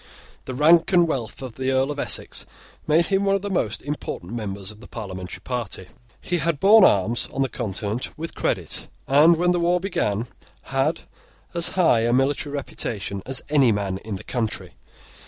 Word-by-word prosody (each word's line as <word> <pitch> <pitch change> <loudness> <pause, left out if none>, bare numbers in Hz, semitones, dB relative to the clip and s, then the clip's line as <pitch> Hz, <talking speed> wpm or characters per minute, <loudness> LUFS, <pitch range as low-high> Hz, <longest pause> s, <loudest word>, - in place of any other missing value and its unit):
The 130 - -5
rank 165 +6 +5
and 175 -2 +5
wealth 130 -5 -3
of 125 -3 -8
the 130 0 -1
Earl 135 +2 +2
of 145 - -5
Essex - - -3 0.4
made 165 +3 +4
him 195 +1 +3
one 195 0 +3
of 195 - -2
the 205 - -3
most 115 - -1
important 140 -9 -5
members 100 -3 -4
of 105 - -15
the - - -12
parliamentary 95 -5 -7
party. 110 -6 -4 0.3
He 175 -1 -1
had 165 -3 0
borne 210 +4 +7
arms 110 - +3
on 135 - 0
the - - 0
Continent 105 +3 -3
with 165 +2 -5
credit, - - -2 0.2
and, 150 +5 +6
when 175 +2 +2
the 175 - +1
war 175 +1 +2
began, 170 - -1 0.4
had 135 +4 0 0.5
as 170 -1 +1
high 165 -10 +5
a 115 +1 +1
military 145 +4 +1
reputation 105 -8 -4
as 130 0 -2
any 140 -5 +5
man 100 -2 -1
in 105 -1 -6
the 95 - -8
country. 115 -4 -3
135 Hz, 185 wpm, -23 LUFS, 110-165 Hz, 0.5 s, borne